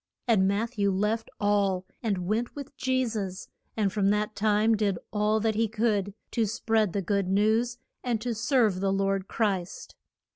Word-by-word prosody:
And 200 -5 +4
Matth 220 +4 -1
ew 200 0 +3
left 210 +4 0
all, 200 -3 +1 0.2
and 200 -6 -1
went 220 +5 -1
with 280 -1 -8
Je 260 0 +1
sus, 200 -5 -4 0.3
and 200 -3 +1
from 200 -2 +2
that 210 +1 0
time 215 +1 +3
did 205 -3 0 0.2
all 210 +1 +2
that 220 0 +1
he 225 +1 +1
could 210 -3 0 0.2
to 230 -3 +1
spread 220 -2 +1
the 200 - -1
good 200 +1 0
news, 220 +5 +2 0.3
and 240 -3 0
to 240 +1 -2
serve 220 -4 +2
the 195 0 +1
Lord 195 0 0
Christ. 195 -6 -2
210 Hz, 175 wpm, -27 LUFS, 195-225 Hz, 0.3 s, And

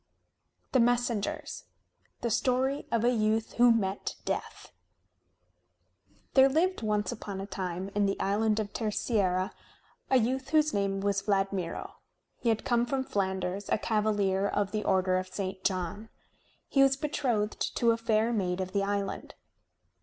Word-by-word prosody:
THE 260 - +3
MESSENGERS 235 -3 0 0.6
The 235 - -1
Story 260 +4 +1
of 230 -1 +1
a 245 - +4
Youth 220 -1 0
Who 240 0 +7
Met 200 -4 -1
Death - - -4 1.6
There 265 0 +7
lived 340 +5 +1
once 210 -1 0
upon 205 -4 -6
a 195 - -4
time 185 -1 -4
in 205 -1 +2
the 195 - -2
island 215 +2 +1
of 205 -2 -4
Terceira 200 -4 0 0.6
a 265 - +5
youth 260 +3 0
whose 310 -1 +3
name 195 -1 0
was 200 0 +1
Vladmiro. 195 -3 -2 0.4
He 235 - 0
had 225 -1 0
come 240 -1 +2
from 265 +1 -1
Flanders, 190 -2 -2
a - - +3
cavalier 205 -3 +1
of 200 -1 -1
the 210 0 -2
order 185 -1 +2
of 185 - -5
St. 190 0 -5
John. 190 +3 -2 0.6
He 275 - +3
was 270 0 +5
betrothed 250 -8 -1 0.2
to 235 -1 +4
a - - +2
fair 225 0 +1
maid 185 -4 -1
of 185 0 -3
the 200 - +1
island. 200 0 -3
210 Hz, 150 wpm, -29 LUFS, 195-235 Hz, 1.6 s, Who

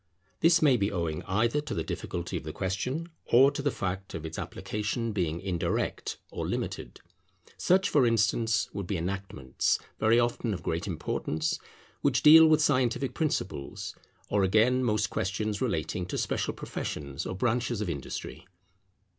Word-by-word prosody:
This 165 0 +5
may 135 -5 +5
be 100 -1 0
owing 85 -5 -2
either 115 +9 +1
to 150 - -5
the 80 - -1
difficulty 85 +2 -4
of - - -3
the 75 - -5
question 125 - -3 0.2
or 135 +4 +6
to 140 - -4
the 145 - +1
fact 95 -6 -4
of 80 -1 -5
its 80 0 -5
application 110 +2 -3
being 85 -5 -1
indirect 90 -3 -2
or - - -3
limited. - - -4 0.6
Such, 190 +2 +3
for 135 -5 +4
instance, 115 0 +2
would 100 -3 -4
be 95 - -1
enactments, 90 -6 -1 0.2
very 110 +2 +4
often 120 -2 0
of - - -9
great 85 +3 -2
importance, 80 -2 -2 0.4
which - - +2
deal 160 +1 +10
with 155 -1 +4
scientific 130 -2 +1
principles; 100 - -3 0.3
or 100 - +1
again 115 +7 +3
most 105 -4 +1
questions 105 +3 -2
relating 90 -6 -1
to - - -3
special - - -1
professions 70 -2 -5
or - - -4
branches 120 +2 0
of 105 - -2
industry. 80 +2 -6
105 Hz, 155 wpm, -29 LUFS, 90-125 Hz, 0.6 s, deal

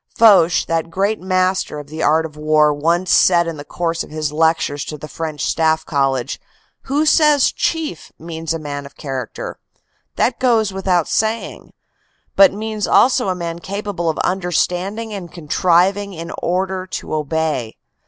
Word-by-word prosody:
Foch, 185 -6 +5
that 165 0 -1
great 200 +5 -1
master 185 -2 0
of 145 - -7
the 155 +2 -7
art 160 +1 +3
of 155 -2 -9
war, 150 0 +3
once 170 +5 0
said 175 -2 +5
in 165 -2 -5
the 145 - -7
course 165 +2 -2
of - - -13
his 155 -1 -3
lectures 155 -2 +1
to 150 - -6
the 155 - -9
French 155 -2 -4
Staff 160 -1 +1
College: 135 -3 -1 0.4
"Who 290 +3 +1
says 300 -3 +4
Chief 320 - -3
means 165 -1 -6
a 165 - 0
man 145 -2 -6
of 140 - -19
character; 135 - -6 0.6
that 245 - 0
goes 225 -5 +2
without 185 -3 +1
saying; 220 +1 -2 0.6
but 195 -1 +7
means 215 0 -3
also 250 -4 +4
a 185 - 0
man 170 -1 -5
capable 200 -2 -3
of 160 - -2
understanding 190 +4 -1
and 185 -4 -7
contriving 180 +5 +1
in 165 0 -7
order 185 +1 -1
to - - -6
obey." 155 -6 -2
170 Hz, 160 wpm, -19 LUFS, 155-195 Hz, 0.6 s, but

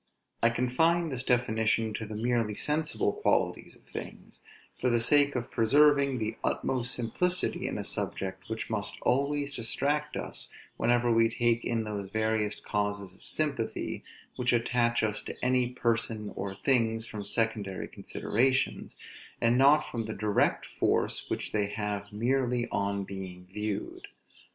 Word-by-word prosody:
I 115 - +5
confine 160 +8 +2
this 130 -3 -2
definition 110 -3 +1
to 110 0 -4
the 110 - -6
merely 115 -1 0
sensible 150 -7 0
qualities - - 0
of - - -22
things, - - -9 0.4
for 125 - +2
the 120 -1 +3
sake 145 +4 +4
of 120 -1 -3
preserving 140 +3 +4
the 110 -1 -3
utmost 125 -2 0
simplicity 180 +10 0
in - - -3
a - - -3
subject, 95 -1 -3
which 110 0 -3
must 105 -2 -2
always 140 +1 +1
distract 145 +6 0
us - - -5 0.3
whenever 120 0 +2
we 115 0 +4
take 120 0 +1
in 115 -1 0
those 105 -2 -4
various 110 0 0
causes 100 -2 -2
of 95 - -20
sympathy 145 -7 -2 0.3
which 125 0 +1
attach 120 0 +2
us 105 -1 0
to - - -6
any 125 -1 +3
persons 115 -3 -1
or 95 0 -4
things 115 -1 +2
from 105 -2 -6
secondary 105 -4 -2
considerations, 130 +4 0 0.4
and 115 +1 +3
not 140 +4 +6
from 115 -2 -4
the 110 - -5
direct 105 0 +1
force - - 0
which - - -3
they 105 -2 +1
have 105 0 -3
merely 120 +2 0
on 100 0 0
being 95 -2 -7
viewed. 105 0 -4
115 Hz, 145 wpm, -29 LUFS, 105-125 Hz, 0.4 s, not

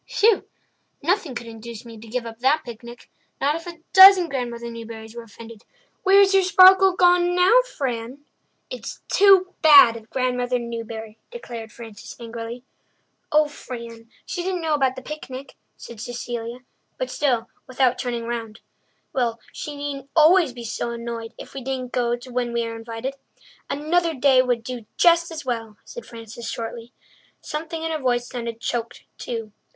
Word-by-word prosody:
"Whew! 430 -1 +4 0.6
Nothing 340 -5 0
could 235 - -5
induce 230 0 -9
me 230 -1 -10
to 225 +1 -12
give 240 +2 -3
up 225 0 -9
that 285 +5 +2
picnic—not 240 +4 -6
if 330 +2 -7
a 335 -2 -9
dozen 380 -2 +9
Grandmother 235 -3 -4
Newburys 225 -1 -9
were 235 - -6
offended. 230 0 -13 0.4
Where's 390 +1 +5
your 390 - +6
sparkle 375 0 +7
gone 355 0 +4
now, 380 +8 +6 0.2
Fran?" 255 +1 -4 0.5
"It's - - -7
too 385 -2 +5
bad 285 -7 +8
of 225 -1 -11
Grandmother 250 -1 0
Newbury," 230 -2 -7
declared 235 - -8
Frances 225 -3 -11
angrily. 230 +1 -7 0.7
"Oh, 305 0 +4
Fran, 235 -5 -9 0.2
she 360 - -4
didn't 360 -1 -3
know 315 -1 0
about 265 -3 +1
the 260 - -9
picnic," 275 -3 -8 0.2
said 230 -3 -10
Cecilia—but 245 - -7
still 245 -5 0 0.2
without 255 -1 +1
turning 240 -2 -3
round. 230 -2 -5 0.5
"Well, 235 -3 0
she 295 - -6
needn't 280 -1 -6
always 325 -1 +5
be 240 -1 -9
so 235 +1 -3
annoyed 235 -1 -6
if - - -11
we 270 - -7
don't 255 -1 -4
go 240 -1 0
when 245 -1 -2
we 235 0 0
are 230 0 -5
invited. 225 +3 -5 0.6
Another 325 +3 0
day 265 -1 +5
would 245 -2 -1
do 240 -2 -7
just 340 -1 +4
as 320 -4 -7
well," 225 -4 -4
said 480 - -10
Frances 230 0 -8
shortly. 230 +1 -6 0.5
Something 320 +1 -5
in 325 - -2
her 315 - -2
voice 245 -2 0
sounded 235 -2 -5
choked 235 +1 -4 0.2
too. 225 -3 -5
245 Hz, 155 wpm, -23 LUFS, 230-310 Hz, 0.7 s, dozen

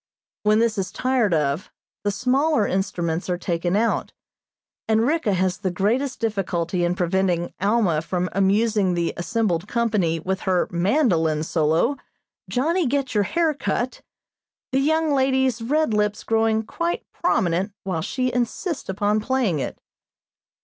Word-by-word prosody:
When 210 0 +3
this 225 -2 +1
is 185 -1 -3
tired 255 -5 +1
of, 150 0 0 0.3
the 205 - +1
smaller 255 +3 +2
instruments 180 -3 -2
are 180 - 0
taken 175 0 -1
out, 225 +2 0 0.7
and 220 +1 +3
Ricka 290 -7 +1
has 185 0 0
the 195 -3 -1
greatest 230 +9 0
difficulty 180 -5 -1
in 175 +1 +1
preventing 180 -1 0
Alma 200 -6 +2
from 180 +2 -2
amusing 195 0 +2
the 170 -1 -1
assembled 185 -1 -1
company 215 -9 0
with 190 +4 -2
her 185 -2 +1
mandolin 170 - +2
solo, 165 - +1 0.5
"Johnny 320 +6 +1
Get 275 0 -1
Your 205 -2 +2
Hair 330 - +1
Cut," 255 -3 -2 0.7
the 265 - +2
young 315 +2 +2
lady's 265 -3 +2
red 295 +2 +1
lips 210 0 0
growing 225 0 +1
quite 335 +9 -3
prominent 195 - +1
while 180 -4 -2
she 255 +8 -1
insists 255 - -2
upon 205 +2 +1
playing 220 - 0
it. - - -4
210 Hz, 140 wpm, -23 LUFS, 180-255 Hz, 0.7 s, When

